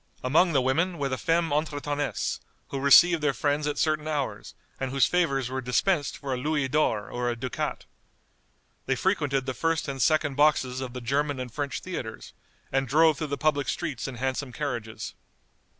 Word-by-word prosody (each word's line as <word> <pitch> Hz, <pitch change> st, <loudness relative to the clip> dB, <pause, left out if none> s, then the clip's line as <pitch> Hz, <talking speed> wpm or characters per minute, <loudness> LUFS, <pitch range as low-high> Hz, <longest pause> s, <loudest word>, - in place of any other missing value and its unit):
Among 160 Hz, +8 st, +4 dB
the 135 Hz, -3 st, +3 dB
women 165 Hz, +7 st, +1 dB
were 140 Hz, -2 st, -1 dB
the 130 Hz, -, -2 dB
femmes 165 Hz, -2 st, +1 dB
entretenness, 145 Hz, -1 st, -1 dB, 0.3 s
who 135 Hz, -, -3 dB
received 160 Hz, +5 st, +7 dB
their 145 Hz, -3 st, +1 dB
friends 145 Hz, 0 st, 0 dB
at 150 Hz, -, -2 dB
certain 155 Hz, -1 st, 0 dB
hours, 140 Hz, -9 st, -3 dB, 0.2 s
and 135 Hz, -, -2 dB
whose 135 Hz, 0 st, +3 dB
favors 140 Hz, -8 st, +1 dB
were 130 Hz, 0 st, -2 dB
dispensed 145 Hz, +4 st, +1 dB
for 135 Hz, -2 st, -4 dB
a -, -, -1 dB
Louis 145 Hz, +1 st, 0 dB
d'or 130 Hz, -7 st, 0 dB
or 120 Hz, 0 st, -1 dB
a 120 Hz, -, -1 dB
ducat. 125 Hz, +1 st, -4 dB, 1.0 s
They 135 Hz, -, +2 dB
frequented 145 Hz, -7 st, 0 dB
the 130 Hz, -, -2 dB
first 165 Hz, +3 st, 0 dB
and 135 Hz, -1 st, -4 dB
second 155 Hz, +1 st, +2 dB
boxes 135 Hz, -3 st, +2 dB
of 130 Hz, -2 st, -5 dB
the 125 Hz, -, -6 dB
German 140 Hz, +3 st, 0 dB
and 125 Hz, -2 st, -6 dB
French 145 Hz, -2 st, -3 dB
theatres, 125 Hz, -12 st, -6 dB, 0.4 s
and 135 Hz, 0 st, +1 dB
drove 155 Hz, +2 st, +4 dB
through 155 Hz, -, -2 dB
the 140 Hz, 0 st, -3 dB
public 145 Hz, -3 st, +1 dB
streets 130 Hz, -3 st, -3 dB
in 135 Hz, -, -6 dB
handsome 130 Hz, +2 st, -2 dB
carriages. 120 Hz, -5 st, -4 dB
140 Hz, 180 wpm, -27 LUFS, 130-155 Hz, 1.0 s, received